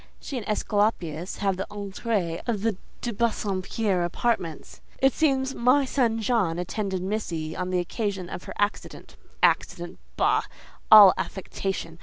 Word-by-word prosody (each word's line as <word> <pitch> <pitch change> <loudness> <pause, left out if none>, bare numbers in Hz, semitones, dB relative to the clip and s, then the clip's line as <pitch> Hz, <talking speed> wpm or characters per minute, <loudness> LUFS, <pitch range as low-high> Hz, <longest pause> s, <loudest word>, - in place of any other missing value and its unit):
She 280 - -7
and 235 -5 -4
Esculapius 205 -6 -1
have 195 -2 +1
the 195 - -4
entrée 200 -3 -3
of 215 -4 -1
the 225 -3 +1 0.3
de 240 - -3
Bassompierre 200 -3 -1
apartments: 175 -3 -2 0.2
it 270 0 +3
seems 270 -4 +1
'my 255 +4 +3
son 240 -4 +1
John' 210 -7 +1
attended 190 +1 -3
missy 170 -6 -3
on 180 0 -3
the 185 - 0
occasion 190 +1 -2
of 175 - -7
her - - -7
accident—Accident? 190 -3 -2 0.2
Bah! - - +3 0.5
All 205 -3 +11
affectation! 185 -3 -4
200 Hz, 135 wpm, -26 LUFS, 180-225 Hz, 0.5 s, All